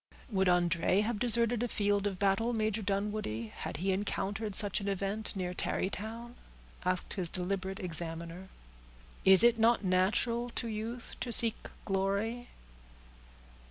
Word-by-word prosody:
"Would 190 Hz, -2 st, +2 dB
André 180 Hz, +2 st, +2 dB
have 220 Hz, -1 st, -2 dB
deserted 235 Hz, 0 st, +3 dB
a 245 Hz, -, 0 dB
field 205 Hz, -2 st, +1 dB
of 195 Hz, -2 st, -3 dB
battle, 200 Hz, +5 st, +1 dB
Major 220 Hz, -1 st, 0 dB
Dunwoodie, 200 Hz, -, -2 dB
had -, -, -6 dB
he 190 Hz, +4 st, 0 dB
encountered 200 Hz, +1 st, -2 dB
such 205 Hz, -1 st, 0 dB
an 200 Hz, -, -4 dB
event, 200 Hz, +3 st, -3 dB
near 180 Hz, -2 st, -3 dB
Tarrytown?" 220 Hz, +6 st, -3 dB, 0.5 s
asked 185 Hz, 0 st, -1 dB
his 180 Hz, -4 st, 0 dB
deliberate 190 Hz, +1 st, -2 dB
examiner. 170 Hz, +1 st, -5 dB, 0.8 s
"Is 190 Hz, +2 st, +9 dB
it 235 Hz, -1 st, +5 dB
not 230 Hz, 0 st, +4 dB
natural 205 Hz, +6 st, +1 dB
to 235 Hz, -, -2 dB
youth 225 Hz, +2 st, -5 dB
to 240 Hz, -, -3 dB
seek 230 Hz, -1 st, +3 dB, 0.2 s
glory?" 200 Hz, +5 st, -1 dB
200 Hz, 135 wpm, -31 LUFS, 185-225 Hz, 0.8 s, Is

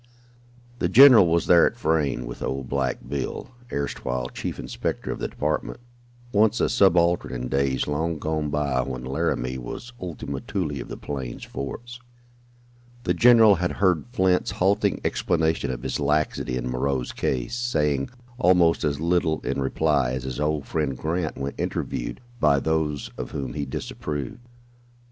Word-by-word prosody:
The 90 Hz, -, +1 dB
general 120 Hz, -3 st, +9 dB
was 85 Hz, 0 st, +2 dB
there 85 Hz, -2 st, +6 dB
at -, -, -5 dB
Frayne, 80 Hz, -3 st, 0 dB
with -, -, -8 dB
old 65 Hz, -1 st, -3 dB
"Black 65 Hz, 0 st, -2 dB
Bill," 70 Hz, -, -4 dB, 0.2 s
erstwhile 65 Hz, -3 st, -3 dB
chief -, -, -5 dB
inspector -, -, -4 dB
of -, -, -5 dB
the -, -, -2 dB
department, -, -, -2 dB, 0.5 s
once 110 Hz, +1 st, +3 dB
a -, -, +2 dB
subaltern 90 Hz, -6 st, +3 dB
in 60 Hz, 0 st, -4 dB
days 70 Hz, 0 st, +1 dB
long 80 Hz, +3 st, -1 dB
gone 75 Hz, 0 st, -2 dB
by 70 Hz, -3 st, 0 dB
when 65 Hz, -1 st, -5 dB
Laramie 65 Hz, -1 st, -1 dB
was 120 Hz, -, -7 dB
"Ultima 75 Hz, -6 st, -5 dB
Thule" 80 Hz, -8 st, -3 dB
of -, -, -8 dB
the -, -, -7 dB
plains 65 Hz, -4 st, -6 dB
forts. 120 Hz, -, -7 dB, 1.0 s
The 90 Hz, -, +1 dB
general 115 Hz, +1 st, +7 dB
had 90 Hz, +1 st, -1 dB
heard 90 Hz, -2 st, +1 dB
Flint's 95 Hz, -6 st, +2 dB
halting 95 Hz, +2 st, +1 dB
explanation 80 Hz, -3 st, 0 dB
of 60 Hz, -2 st, -4 dB
his -, -, -2 dB
laxity 75 Hz, -4 st, 0 dB
in 65 Hz, 0 st, -3 dB
Moreau's 65 Hz, +1 st, -1 dB
case, 65 Hz, -, -2 dB
saying 75 Hz, -, 0 dB, 0.3 s
almost 90 Hz, -6 st, +4 dB
as 70 Hz, -1 st, 0 dB
little 85 Hz, -1 st, +1 dB
in -, -, -2 dB
reply 70 Hz, -2 st, +1 dB
as 65 Hz, 0 st, -3 dB
his 65 Hz, 0 st, -5 dB
old 75 Hz, -1 st, 0 dB
friend 75 Hz, -5 st, -2 dB
Grant 80 Hz, +2 st, -2 dB
when 70 Hz, +1 st, -3 dB
"interviewed" -, -, -3 dB, 0.2 s
by 70 Hz, -8 st, +4 dB
those 80 Hz, -1 st, -1 dB
of -, -, -4 dB
whom 65 Hz, -3 st, -4 dB
he 75 Hz, -1 st, -3 dB
disapproved. 70 Hz, -, -5 dB
75 Hz, 155 wpm, -24 LUFS, 65-90 Hz, 1.0 s, general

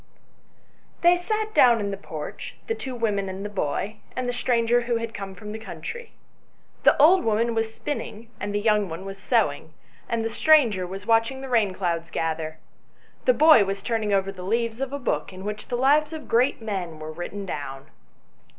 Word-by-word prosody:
THEY 345 Hz, +1 st, +7 dB
sat 430 Hz, +4 st, -2 dB
down 240 Hz, -2 st, +6 dB
in 200 Hz, -1 st, -2 dB
the -, -, -2 dB
porch, 155 Hz, -6 st, -7 dB
the 450 Hz, -, -1 dB
two 265 Hz, -, -6 dB
women 205 Hz, -4 st, -1 dB
and 190 Hz, +2 st, -6 dB
the -, -, -3 dB
boy, 200 Hz, +3 st, -2 dB, 0.2 s
and 255 Hz, -1 st, -2 dB
the 245 Hz, -, -1 dB
stranger 240 Hz, -1 st, +2 dB
who 240 Hz, 0 st, -1 dB
had 230 Hz, 0 st, -3 dB
come 195 Hz, -1 st, -6 dB
from 210 Hz, +3 st, -8 dB
the 220 Hz, -, -6 dB
country. 455 Hz, -, -7 dB, 0.7 s
The -, -, +4 dB
old 350 Hz, +6 st, +6 dB
woman 225 Hz, +2 st, +1 dB
was 225 Hz, 0 st, -1 dB
spinning, 230 Hz, -3 st, -5 dB
and 205 Hz, -, -3 dB
the 205 Hz, -, 0 dB
young 210 Hz, -2 st, +2 dB
one 165 Hz, +4 st, -6 dB
was 195 Hz, 0 st, -7 dB
sewing, 160 Hz, -, 0 dB, 0.3 s
and 230 Hz, -1 st, -1 dB
the -, -, 0 dB
stranger 230 Hz, -, +4 dB
was 195 Hz, +2 st, -7 dB
watch 225 Hz, 0 st, +3 dB
ing 265 Hz, 0 st, -8 dB
the 270 Hz, -, -7 dB
rain 215 Hz, -6 st, +2 dB
clouds 170 Hz, -3 st, -2 dB
gather. 160 Hz, -1 st, -2 dB, 0.7 s
The -, -, +5 dB
boy 310 Hz, -8 st, +7 dB
was 195 Hz, 0 st, -4 dB
turning 220 Hz, -3 st, -1 dB
over 195 Hz, -1 st, +1 dB
the 190 Hz, -2 st, -10 dB
leaves 230 Hz, +5 st, -1 dB
of 270 Hz, -1 st, -2 dB
a 280 Hz, -, -2 dB
book 265 Hz, -, -2 dB
in 185 Hz, 0 st, -10 dB
which 210 Hz, 0 st, -5 dB
the 245 Hz, -, -2 dB
lives 295 Hz, +4 st, +3 dB
of 315 Hz, -1 st, -7 dB
great 240 Hz, 0 st, +2 dB
men 185 Hz, -7 st, -4 dB
were 155 Hz, 0 st, -7 dB
written 175 Hz, +5 st, -6 dB
down. 140 Hz, -5 st, -6 dB
220 Hz, 200 wpm, -25 LUFS, 195-245 Hz, 0.7 s, THEY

